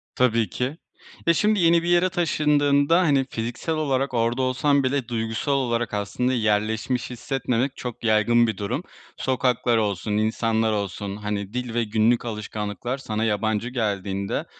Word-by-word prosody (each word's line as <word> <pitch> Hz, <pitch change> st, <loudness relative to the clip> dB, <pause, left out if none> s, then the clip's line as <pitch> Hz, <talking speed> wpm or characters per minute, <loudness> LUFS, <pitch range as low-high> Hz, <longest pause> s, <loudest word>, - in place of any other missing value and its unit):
Tabii 115 Hz, -5 st, +2 dB
ki. 130 Hz, -, -3 dB, 0.5 s
Ya, 170 Hz, -, +6 dB
şimdi 210 Hz, +4 st, +2 dB
yeni 170 Hz, 0 st, +4 dB
bir -, -, -3 dB
yere 175 Hz, +1 st, +4 dB
taşındığında, 150 Hz, -2 st, +2 dB
hani, 140 Hz, -6 st, +3 dB
fiziksel 120 Hz, +8 st, -3 dB
olarak 135 Hz, -3 st, 0 dB
orada 120 Hz, +2 st, +1 dB
olsan 130 Hz, +2 st, +2 dB
bile 130 Hz, -2 st, 0 dB
duygusal 115 Hz, +4 st, -2 dB
olarak 120 Hz, -5 st, 0 dB
aslında 105 Hz, +5 st, -1 dB
yerleşmiş 110 Hz, +2 st, 0 dB
hissetmemek 130 Hz, +1 st, -2 dB
çok 120 Hz, -2 st, -7 dB
yaygın 115 Hz, +2 st, +4 dB
bir 110 Hz, -4 st, -2 dB
durum. 125 Hz, -, -3 dB, 0.3 s
Sokaklar 125 Hz, -3 st, +1 dB
olsun, 105 Hz, -1 st, -1 dB
insanlar 110 Hz, +1 st, +1 dB
olsun, 100 Hz, -1 st, -3 dB
hani 105 Hz, -1 st, -4 dB
dil 125 Hz, -2 st, -3 dB
ve 120 Hz, -1 st, +1 dB
günlük 110 Hz, +3 st, +2 dB
alışkanlıklar 105 Hz, +3 st, -4 dB
sana 110 Hz, -4 st, -3 dB
yabancı 110 Hz, +2 st, 0 dB
geldiğinde, 100 Hz, -5 st, -2 dB
120 Hz, 145 wpm, -24 LUFS, 110-135 Hz, 0.5 s, Ya